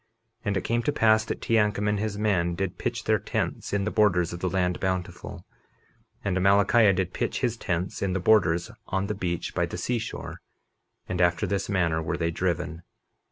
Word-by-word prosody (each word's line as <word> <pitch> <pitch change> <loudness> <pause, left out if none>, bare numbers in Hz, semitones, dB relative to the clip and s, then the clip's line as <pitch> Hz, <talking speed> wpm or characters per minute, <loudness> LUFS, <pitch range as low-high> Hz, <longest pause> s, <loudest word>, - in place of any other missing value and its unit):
And 100 -3 0
it 95 - -2
came 120 +1 0
to 145 - 0
pass 110 -5 +4
that - - -4
Teancum 105 -2 +2
and 105 -1 +1
his 105 -1 -2
men 90 -5 +1
did 95 0 -3
pitch - - -2
their - - +2
tents - - -3
in 100 -1 0
the 110 - -1
borders 90 -6 +2
of 85 - -5
the 90 - -1
land 90 -1 0
Bountiful; 95 -1 -4 0.8
and 95 - 0
Amalickiah 100 +2 +4
did 90 -1 -1
pitch - - -2
his 120 -3 +1
tents 90 -5 -3
in 95 -2 0
the 95 - 0
borders 90 -4 +3 0.2
on 95 0 -1
the 105 - -2
beach 90 -4 -3
by 85 -1 0
the 90 - -6
seashore, 115 +5 -4 0.7
and 90 -1 -1
after 85 -1 +2
this 100 -1 -2
manner 85 -5 +1
were 85 +2 -2
they 85 -1 0
driven. 85 -1 -2
95 Hz, 195 wpm, -26 LUFS, 90-105 Hz, 0.8 s, pass